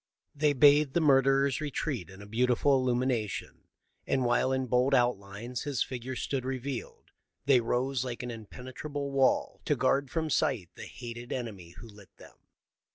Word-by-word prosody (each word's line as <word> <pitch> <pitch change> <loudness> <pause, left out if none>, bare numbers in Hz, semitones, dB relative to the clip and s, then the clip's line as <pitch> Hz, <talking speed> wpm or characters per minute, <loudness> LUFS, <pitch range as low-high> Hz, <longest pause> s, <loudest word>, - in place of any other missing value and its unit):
They 150 0 +2
bathed 145 0 +5
the - - +4
murderer's 135 -1 +3
retreat 140 - -3
in 95 +1 -11
a - - -10
beautiful 125 +5 +2
illumination, 125 -4 -1 0.4
and, 130 -2 +1
while 120 +2 +2
in 130 0 0
bold 125 +3 +2
outlines 120 0 -1
his 145 -2 -1
figure 130 0 -6
sto'od 135 +1 -2
revealed, 130 0 -5 0.3
they 135 -3 +5
rose 125 +2 0
like 125 -1 -5
an 125 - -4
impene 120 +3 -9
trable 145 0 -4
wall 135 -1 +1
to - - +2
guard 140 0 +1
from 160 0 -2
sight 130 - 0
the - - -9
hated 120 0 -8
enemy 100 -9 -6
who 115 - -10
lit 105 -3 -15
them. - - -15
130 Hz, 160 wpm, -29 LUFS, 120-140 Hz, 0.4 s, bathed